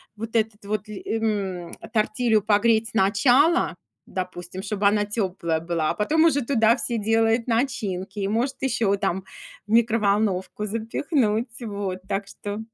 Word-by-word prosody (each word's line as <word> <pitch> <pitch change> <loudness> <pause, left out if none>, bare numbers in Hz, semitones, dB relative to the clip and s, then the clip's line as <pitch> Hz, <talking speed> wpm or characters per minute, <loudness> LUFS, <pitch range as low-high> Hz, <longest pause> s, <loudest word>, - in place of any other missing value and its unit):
вот 225 +2 -7
этот 220 -1 -1
вот 215 +1 -3
ль 210 - -7
эм, 200 -6 -2 0.2
тортилью 215 0 +2
погреть 220 +2 +3
сначала, 245 - +3 0.3
допустим, 185 0 -5
чтобы 200 0 +1
она 205 0 +2
теплая 185 -6 -1
была, 165 -2 -1
а - - -1
потом 315 +10 +2
уже 285 -4 +3
туда 230 -2 +3
все 240 -2 -2
делают 225 +2 +2
начинки, 210 -5 -1
и 195 - 0
может 240 +6 0
еще 220 -6 +1
там 190 -1 -1 0.4
в - - -9
микроволновку 210 -3 +1
запихнуть. 230 - -1
Вот, 200 -4 -4
так 195 0 -2
что. 205 +1 -6
215 Hz, 140 wpm, -24 LUFS, 195-230 Hz, 0.4 s, погреть